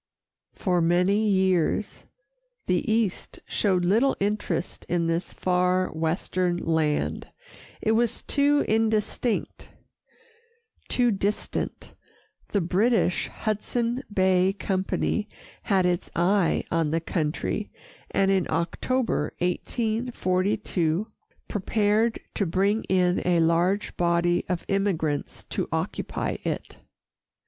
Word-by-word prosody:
For 180 Hz, -2 st, +1 dB
many 180 Hz, +6 st, +3 dB
years, 190 Hz, 0 st, +1 dB, 0.6 s
the 180 Hz, +4 st, 0 dB
East 220 Hz, -4 st, -1 dB
showed 185 Hz, -4 st, +1 dB
little 230 Hz, +9 st, +3 dB
interest 205 Hz, -3 st, -2 dB
in 170 Hz, -1 st, +1 dB
this 165 Hz, +1 st, -1 dB
far 180 Hz, 0 st, +1 dB
western 175 Hz, +2 st, -1 dB
land 160 Hz, -3 st, 0 dB, 0.6 s
it 220 Hz, -, +2 dB
was 230 Hz, +1 st, +1 dB
too 290 Hz, 0 st, +2 dB
indistinct, 220 Hz, +1 st, 0 dB, 1.2 s
too 245 Hz, -1 st, +3 dB
distant. 200 Hz, +1 st, -2 dB, 0.5 s
The 200 Hz, -, 0 dB
British 190 Hz, +2 st, +2 dB
Hudson 235 Hz, +3 st, -2 dB
Bay 190 Hz, -1 st, +3 dB
Company 195 Hz, +2 st, -1 dB, 0.3 s
had 190 Hz, -3 st, +2 dB
its 175 Hz, -1 st, 0 dB
eye 180 Hz, +1 st, +2 dB
on 165 Hz, -2 st, +1 dB
the 165 Hz, +2 st, +1 dB
country, 165 Hz, +5 st, -2 dB, 0.4 s
and 195 Hz, 0 st, +2 dB
in 190 Hz, -2 st, +2 dB
October, 170 Hz, -, -1 dB
1842, 200 Hz, -3 st, -1 dB, 0.4 s
prepared 215 Hz, +2 st, +1 dB
to 200 Hz, -, 0 dB
bring 200 Hz, +6 st, +1 dB
in 180 Hz, -1 st, +2 dB
a 175 Hz, -1 st, +2 dB
large 170 Hz, +5 st, +1 dB
body 175 Hz, 0 st, +2 dB
of 180 Hz, -2 st, -2 dB
immigrants 180 Hz, -7 st, -1 dB
to -, -, -2 dB
occupy -, -, -2 dB
it. -, -, -4 dB
190 Hz, 100 wpm, -26 LUFS, 175-215 Hz, 1.2 s, many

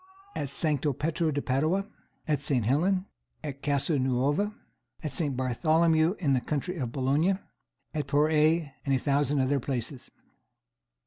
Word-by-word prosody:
At 140 Hz, -, -3 dB
Sancto 145 Hz, 0 st, +1 dB
Petro 160 Hz, +4 st, -1 dB
de 145 Hz, -1 st, -2 dB
Padua. 155 Hz, +10 st, +1 dB, 0.4 s
At 150 Hz, -2 st, +1 dB
St. 135 Hz, -6 st, +1 dB
Helen. 180 Hz, -, +2 dB, 0.4 s
At 140 Hz, -2 st, -6 dB
Casa 145 Hz, +1 st, +1 dB
Nuova. 135 Hz, +10 st, +1 dB, 0.5 s
At 155 Hz, -, -3 dB
St. 145 Hz, -7 st, 0 dB
Bartholomew, 160 Hz, -, +2 dB
in 145 Hz, -7 st, +1 dB
the 130 Hz, -, +2 dB
county 155 Hz, +7 st, -3 dB
of 125 Hz, -6 st, -3 dB
Boulogne. 145 Hz, +9 st, +1 dB, 0.6 s
At 150 Hz, -2 st, -2 dB
the -, -, -14 dB
Porrette, 155 Hz, +1 st, +3 dB
and 140 Hz, -2 st, +1 dB
a -, -, +3 dB
thousand 140 Hz, +1 st, +1 dB
other 140 Hz, +2 st, +1 dB
places. 125 Hz, 0 st, -4 dB
145 Hz, 145 wpm, -28 LUFS, 135-160 Hz, 0.6 s, Porrette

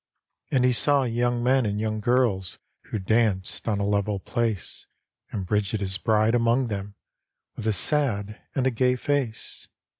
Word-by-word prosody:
And 130 Hz, -2 st, +2 dB
he 125 Hz, -, +4 dB
saw 140 Hz, +3 st, +3 dB
young 120 Hz, 0 st, 0 dB
men 130 Hz, +1 st, +3 dB
and 105 Hz, -1 st, -1 dB
young 110 Hz, 0 st, -1 dB
girb 120 Hz, -4 st, +2 dB, 0.4 s
Who -, -, -4 dB
danced 105 Hz, -1 st, 0 dB
on 105 Hz, -3 st, +1 dB
a 100 Hz, -, 0 dB
level 100 Hz, 0 st, 0 dB
place, 115 Hz, -1 st, -3 dB, 0.4 s
And 95 Hz, -3 st, -4 dB
Bridget 105 Hz, +2 st, 0 dB
his 95 Hz, 0 st, -1 dB
bride 110 Hz, 0 st, +2 dB
among 120 Hz, +1 st, +2 dB
them, 100 Hz, -1 st, -5 dB, 0.6 s
With 110 Hz, -, -5 dB
a 110 Hz, -, +3 dB
sad 105 Hz, -3 st, 0 dB
and 130 Hz, -, +1 dB
a 130 Hz, -, +3 dB
gay 125 Hz, +2 st, +2 dB
face. 130 Hz, -4 st, -3 dB
110 Hz, 160 wpm, -25 LUFS, 100-125 Hz, 0.6 s, he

